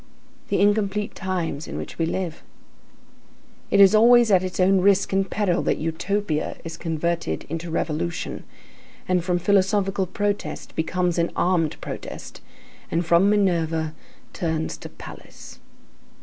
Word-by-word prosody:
The - - 0
incomplete 205 0 +1
times 170 -5 -3
in - - -6
which - - -7
we 165 - +1
live. 175 -2 -3 1.3
It - - +3
is 195 0 +8
always 235 +1 +6
at 185 -2 +5
its 185 -1 -5
own 190 +1 +4
risk 195 0 +3
and 195 0 +1
peril 195 -5 0
that - - 0
Utopia 165 +1 -2
is 165 0 -6
converted 165 - -2
into 165 +2 -4
revolution, 165 +1 -3 0.6
and 180 -3 +1
from 180 0 +1
philosophical 195 +1 +1
protest 205 +2 -3
becomes 175 +1 0
an 170 - +1
armed 175 -4 +1
protest, - - -8 0.5
and 170 +1 0
from 170 +4 +4
Minerva 165 -6 +1 0.4
turns 160 -2 -2
to - - -9
Pallas. - - -12
180 Hz, 135 wpm, -23 LUFS, 165-200 Hz, 1.3 s, is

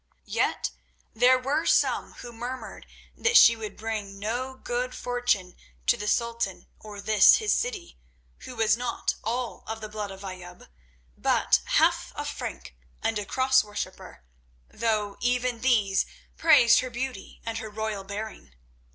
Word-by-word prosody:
Yet - - -1 0.4
there 250 +3 +5
were 280 +5 -1
some - - +2
who 240 -1 -10
murmured 245 +3 -7 0.3
that 455 0 +4
she 230 - +8
would 220 -2 -7
bring 210 -3 -4
no 245 +6 -3
good - - -3
fortune 245 -7 -1 0.3
to - - +4
the 210 -3 -5
Sultan 235 -3 -1
or 210 -1 -10
this 210 0 +6
his 430 -1 +1
city, 435 -8 -3 0.4
who 255 -1 -9
was 220 -1 +3
not 240 0 -2
all 240 +1 -3
of 220 0 -4
the 215 - -6
blood 210 -1 -5
of 195 0 -10
Ayoub, 180 -1 -9 0.5
but - - +2 0.2
half - - +3
a - - -4
Frank, - - -6 0.3
and 225 -2 0
a 205 - -5
Cross 260 +2 +3
worshipper, 210 - -7 0.5
though 215 -3 -1
even 245 -1 0
these 210 -7 +2 0.3
praised 235 - +6
her 255 - -3
beauty 250 +2 -6
and 225 0 -3
her 220 - -6
royal 215 -1 -4
bearing. 200 - -7
225 Hz, 150 wpm, -27 LUFS, 210-250 Hz, 0.5 s, she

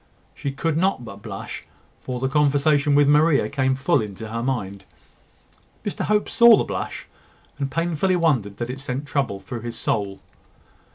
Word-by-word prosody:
She 140 -1 -4
could 155 +3 -1
not 185 -8 +1
but 100 -2 -10
blush; - - -7 0.4
for 125 -1 -4
the 130 - 0
conversation 145 +1 +3
with 145 0 +5
Maria 150 +1 +4
came 130 -2 +1
full 140 +3 +2
into 105 +1 -7
her 115 +1 -3
mind. 100 -7 -3 1.0
Mr - - -2
Hope 210 0 +1
saw 235 -2 +7
the - - +1
blush, - - -5 0.5
and 140 -1 -1
painfully 170 +4 0
wondered 130 - +1
that 120 +1 -3
it 135 +1 -7
sent 135 +1 -4
trouble 135 -8 -1
through 110 +5 -7
his 120 0 -6
soul. 100 -3 -2
135 Hz, 165 wpm, -23 LUFS, 115-150 Hz, 1.0 s, saw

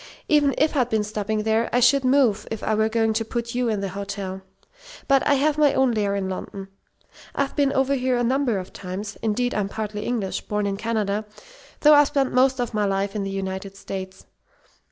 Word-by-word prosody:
Even 290 -2 +3
if 305 +1 +2
I'd 250 -4 +2
been 220 -2 +1
stopping 215 0 -2
there, 220 +1 +1
I 245 - +3
should 260 +3 +4
move 255 -6 +2
if 225 - -5
I 220 - 0
were 220 +1 +2
going 225 0 +1
to 225 +1 0
put 235 +1 -4
you 245 -1 0
in 210 -3 -1
the 195 - -2
hotel. 195 -1 -5 0.7
But 275 -1 +4
I 290 - +4
have 300 +2 +1
my 290 -2 +4
own 265 -2 +3
lair 205 -3 0
in 195 -1 -2
London. 195 +1 -6 0.7
I've 280 0 -1
been 280 -2 +2
over 270 0 +1
here 255 -2 +1
a 240 - +1
number 255 -2 +1
of 185 -1 -7
times. 200 +2 -6
Indeed, 235 +3 0
I'm 200 -2 -1
partly 210 0 -4
English, 220 -6 -2
born 210 0 -1
in 200 -1 -1
Canada, 215 -1 -1 0.6
though 300 0 +7
I've 290 -1 +6
spent 275 -3 0
most 260 +1 +3
of 240 -2 -2
my 210 -1 +1
life 195 +1 -1
in 210 - -1
the 195 - -3
United 195 0 -5
States. 190 -1 -7
220 Hz, 215 wpm, -23 LUFS, 200-255 Hz, 0.7 s, though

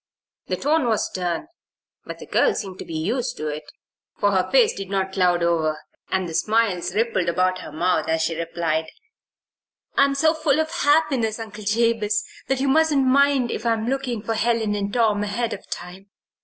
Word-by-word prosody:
The - - -1
tone 295 -2 +1
was 220 -2 +1
stern, 180 - -3 0.6
but - - -7
the - - -10
girl 480 - +2
seemed 190 -2 -5
to - - -6
be 160 - -5
used 225 +11 -2
to 155 0 -3
it, 150 +1 -6 0.5
for 205 - +2
her 190 -2 +1
face - - +5
did 195 -1 -7
not 190 -1 -1
cloud 180 -2 +2
over, 160 -2 +1 0.3
and 190 -1 0
the 165 - -7
smiles 205 -3 +1
rippled 220 -6 +1
about 185 +1 +1
her - - -9
mouth 180 +3 0
as 160 0 +1
she 165 - -1
replied: 165 -1 -2 1.1
"I'm 275 0 +3
so 315 +3 +3
full 310 -2 +1
of 315 0 0
happiness, 275 -7 +2
Uncle 215 -2 -8
Jabez, 215 -1 +1 0.2
that 270 -1 0
you 275 - 0
mustn't 295 -1 +3
mind 275 -2 +3
if - - -4
I'm 225 -2 0
looking 255 -4 -2
for 225 - -1
Helen 225 -1 +1
and 200 -1 -2
Tom 220 -3 +2
ahead 225 +3 -2
of - - -10
time. 180 +3 -8
215 Hz, 185 wpm, -23 LUFS, 180-255 Hz, 1.1 s, face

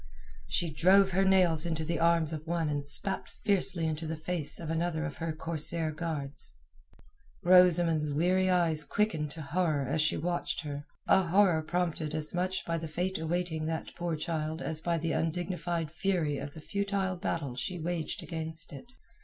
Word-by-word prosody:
She 160 - -1
drove 190 +4 +5
her 190 +2 +3
nails 180 -5 +4
into 160 -2 -2
the 165 0 -1
arms 165 -1 +3
of 155 +1 -6
one 165 -2 0
and 145 -1 -2
spat 190 +7 -3
fiercely 185 -4 +1
into 160 0 -2
the 160 - -2
face 160 -1 -3
of 165 -2 -4
another 165 -1 -1
of 160 - -5
her 165 0 -2
corsair 160 0 0
guards. 150 - -2 0.9
Rosamund's 175 -4 +5
weary 180 +5 +2
eyes 170 -4 +4
quickened 160 -6 0
to 155 +2 -7
horror 155 -3 0
as 150 +4 +1
she 155 - +2
watched 175 +2 -1
her—a 150 +4 0
horror 180 -2 +4
prompted 160 -2 -2
as 155 -1 -2
much 185 +1 -1
by 165 0 -1
the 160 - -5
fate 180 +4 -2
awaiting 160 -1 -2
that 160 0 -4
poor 170 -1 -2
child 155 0 -3
as 160 -2 -2
by 170 0 0
the 165 0 -1
undignified 170 -1 -2
fury 165 -5 0
of 140 +1 -7
the 160 - -9
futile 200 +1 -1
battle 150 -7 -3
she 180 +8 -3
waged 165 -1 -3
against 160 -1 -5
it. 140 - -9
165 Hz, 170 wpm, -30 LUFS, 155-180 Hz, 0.9 s, drove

